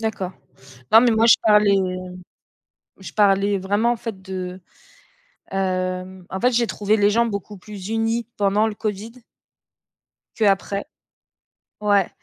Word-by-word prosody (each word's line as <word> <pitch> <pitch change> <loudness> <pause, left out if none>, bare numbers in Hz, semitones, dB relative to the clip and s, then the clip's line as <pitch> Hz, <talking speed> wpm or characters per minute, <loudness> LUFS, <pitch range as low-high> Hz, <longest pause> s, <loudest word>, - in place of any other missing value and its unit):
D'accord. 200 -5 -3 0.6
Non, 225 - +8
mais 240 0 +4
moi 225 +1 +3
je 230 - +8
parlais 210 -2 +4 1.2
je 190 - -10
parlais 200 -1 +3
vraiment 205 +5 +1
en - - 0
fait 220 -4 -7
de, 185 -1 -6 0.9
hem, 185 -1 -3
en 190 - -4
fait, 250 +1 +3
j'ai 235 0 +2
trouvé 210 +1 0
les 205 - +4
gens 235 +2 +3
beaucoup 205 -1 -5
plus 200 0 -9
unis 225 +1 -1
pendant 205 +1 +2
le 220 - -3
Covid 215 +1 -4 1.2
que 220 - +1
après. 200 0 +1 1.0
Ouais 205 -3 +2
205 Hz, 135 wpm, -22 LUFS, 190-220 Hz, 1.2 s, Non